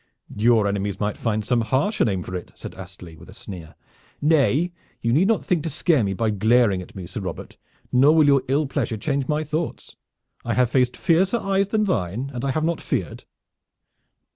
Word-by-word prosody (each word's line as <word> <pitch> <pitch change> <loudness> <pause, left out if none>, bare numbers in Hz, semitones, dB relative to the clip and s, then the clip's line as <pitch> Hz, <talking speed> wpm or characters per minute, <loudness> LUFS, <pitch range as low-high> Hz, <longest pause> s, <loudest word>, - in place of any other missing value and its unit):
"Your 110 0 +3
enemies 100 0 -2
might 105 0 -1
find 110 -2 -2
some 120 +1 +2
harsher 130 - +1
name 95 -5 -1
for 90 - -8
it," 90 - -6
said - - -9
Astley 90 -3 -11
with 85 +3 -15
a 95 - -12
sneer. 90 -8 -9 0.4
"Nay, 155 +2 +2 0.3
you 115 -1 0
need 170 +8 +4
not 225 -2 +1
think 175 -4 +1
to 165 - -3
scare 155 - +2
me 95 -1 -1
by 110 +2 0
glaring 110 -1 +3
at 90 - -13
me, 95 -2 -7
Sir 90 +4 -6
Robert, 95 - -7 0.4
nor 140 +5 +5
will 155 -2 +5
your 140 -2 +4
ill 140 +4 +1
pleasure 130 -5 -2
change 140 +3 -2
my 150 +1 0
thoughts. 155 +2 -4 0.5
I 115 - -2
have 125 -2 +2
faced 125 -2 +2
fiercer 190 +6 +2
eyes 195 -2 0
than 215 +1 +1
thine, 120 - -2
and 125 0 -5
I 140 - 0
have 155 +4 -1
not 165 0 -1
feared." 95 - -3
125 Hz, 200 wpm, -23 LUFS, 100-155 Hz, 0.5 s, nor